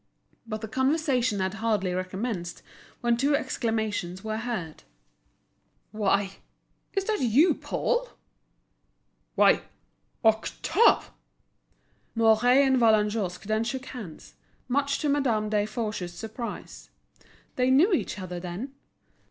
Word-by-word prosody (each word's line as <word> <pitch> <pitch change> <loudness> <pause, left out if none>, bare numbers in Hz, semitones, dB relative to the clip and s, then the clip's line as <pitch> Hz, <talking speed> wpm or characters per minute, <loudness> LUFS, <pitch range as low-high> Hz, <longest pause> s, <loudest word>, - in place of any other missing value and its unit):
But 215 -1 -4
the 220 - -4
conversation 260 -3 +1
had 190 0 -1
hardly 215 -4 0
recommenced 185 0 -4 0.4
when 235 -1 +2
two 280 +4 +2
exclamations 220 - -2
were 220 0 -2
heard: 220 -9 -4 1.1
"What! 200 -2 0 0.5
Is 390 - 0
that 430 -5 -1
you, 260 +8 +4
Paul?" - - -1 1.3
"Why, - - +5 0.6
Octave!" 270 - +3 1.0
Mouret 225 0 +4 0.2
and 265 -1 +3
Vallagnosc 210 -5 +2
then 215 +2 0
shook 260 +2 -4
hands, 210 -13 -9 0.3
much 280 +2 +1
to 305 - 0
Madame 240 -7 +1
Desforges's 210 -3 -2
surprise. 225 +5 -7 0.7
They 250 0 +2
knew 315 +10 +5
each 335 - -1
other, 180 -2 -5
then? 185 +10 -6
220 Hz, 105 wpm, -27 LUFS, 205-260 Hz, 1.3 s, Why